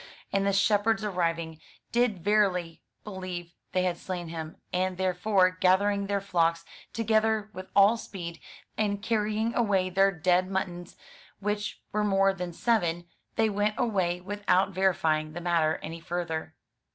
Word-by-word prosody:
And 195 Hz, 0 st, +2 dB
the -, -, +3 dB
shepherds 205 Hz, +2 st, +2 dB
arriving, 165 Hz, -5 st, -1 dB, 0.3 s
did 235 Hz, -7 st, +1 dB
verily 185 Hz, -5 st, +1 dB, 0.2 s
believe 185 Hz, -4 st, -6 dB, 0.2 s
they 185 Hz, -, +1 dB
had 180 Hz, -2 st, -1 dB
slain 175 Hz, -3 st, -5 dB
him; 160 Hz, -1 st, -6 dB, 0.2 s
and 185 Hz, 0 st, 0 dB
therefore, 185 Hz, +1 st, +2 dB
gathering 195 Hz, +2 st, +2 dB
their 200 Hz, 0 st, 0 dB
flocks 170 Hz, -3 st, +1 dB, 0.3 s
together 220 Hz, -1 st, +1 dB
with 185 Hz, 0 st, -8 dB
all 205 Hz, +3 st, +6 dB
speed, 170 Hz, -6 st, -7 dB, 0.4 s
and 205 Hz, -1 st, 0 dB
carrying 220 Hz, 0 st, 0 dB
away 195 Hz, -5 st, +1 dB
their 195 Hz, +2 st, +4 dB
dead 180 Hz, +1 st, +2 dB
muttons, 180 Hz, -2 st, -4 dB, 0.4 s
which 210 Hz, +1 st, -3 dB
were 210 Hz, 0 st, 0 dB
more 195 Hz, -1 st, +3 dB
than 180 Hz, -2 st, -5 dB
seven, 175 Hz, -4 st, 0 dB, 0.3 s
they 225 Hz, -1 st, +3 dB
went 210 Hz, 0 st, 0 dB
away 190 Hz, -8 st, 0 dB
without 195 Hz, 0 st, +1 dB
verifying 160 Hz, -5 st, +1 dB
the 175 Hz, -, -5 dB
matter 165 Hz, -2 st, +2 dB
any 165 Hz, +2 st, -6 dB
further. 165 Hz, -2 st, -4 dB
190 Hz, 140 wpm, -28 LUFS, 175-205 Hz, 0.4 s, all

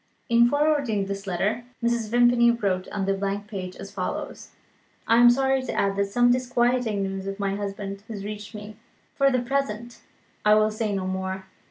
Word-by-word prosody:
In 235 Hz, 0 st, +5 dB
forwarding 285 Hz, -8 st, +1 dB
this 195 Hz, 0 st, -5 dB
letter, 195 Hz, +6 st, -1 dB, 0.2 s
Mrs. 235 Hz, -2 st, 0 dB
Vimpany 240 Hz, 0 st, +5 dB
wrote 195 Hz, -6 st, 0 dB
on 200 Hz, -2 st, -3 dB
the 195 Hz, -, +1 dB
blank 200 Hz, +1 st, -2 dB
page 190 Hz, -3 st, -6 dB
as 195 Hz, 0 st, -9 dB
follows: 190 Hz, -2 st, -5 dB, 0.6 s
"I 230 Hz, -, +5 dB
am 240 Hz, 0 st, +8 dB
sorry 265 Hz, +1 st, +2 dB
to 255 Hz, -, -4 dB
add 195 Hz, 0 st, +1 dB
that 200 Hz, 0 st, +1 dB
some 245 Hz, +5 st, +3 dB
disquieting 245 Hz, -4 st, +1 dB
news 195 Hz, 0 st, -4 dB
of 195 Hz, +1 st, -5 dB
my 200 Hz, -1 st, -1 dB
husband 200 Hz, 0 st, -5 dB
has 205 Hz, -3 st, -6 dB
reached 210 Hz, +1 st, -7 dB
me. 210 Hz, 0 st, -9 dB, 0.4 s
For 275 Hz, 0 st, +3 dB
the 255 Hz, -2 st, 0 dB
present, 240 Hz, -3 st, -3 dB, 0.4 s
I 210 Hz, 0 st, +6 dB
will 215 Hz, 0 st, +3 dB
say 215 Hz, 0 st, -2 dB
no 195 Hz, -2 st, -2 dB
more. 190 Hz, 0 st, -3 dB
210 Hz, 185 wpm, -25 LUFS, 195-240 Hz, 0.6 s, am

